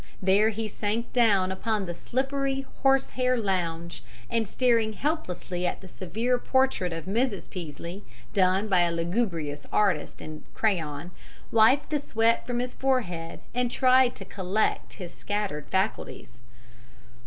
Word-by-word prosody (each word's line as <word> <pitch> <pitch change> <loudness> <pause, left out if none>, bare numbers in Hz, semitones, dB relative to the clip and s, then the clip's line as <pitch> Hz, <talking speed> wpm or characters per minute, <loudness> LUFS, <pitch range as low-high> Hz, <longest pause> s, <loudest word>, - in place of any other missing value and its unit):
There 195 +3 +4
he 220 0 -3
sank 215 +3 -3
down 200 -6 +4
upon 210 +1 -1
the 175 - -4
slippery 270 +6 -1
horsehair 260 -2 +2
lounge, 170 -5 -2 0.3
and, 225 -2 +1
staring 230 -1 +2
helplessly 185 - -2
at - - -3
the 190 - -11
severe 225 +8 -1
portrait 260 -9 +1
of 165 -1 -5
Mrs. 220 +1 0
Peaslee, 170 +3 -7 0.3
done 190 +1 +3
by 190 -3 +3
a 175 -1 +3
lugubrious 170 -4 -2
artist 190 -8 +1
in 155 0 -8
crayon, 170 -6 -1 0.4
wiped 230 +7 +4
the 300 - +2
sweat 230 -4 +1
from 245 -1 -1
his 250 +1 -2
forehead 180 -12 -1
and 245 0 +1
tried 255 0 +4
to 195 - -9
collect 190 +3 -1
his 180 -3 -8
scattered 205 -8 -3
faculties. 190 - -2
205 Hz, 135 wpm, -27 LUFS, 180-245 Hz, 0.4 s, There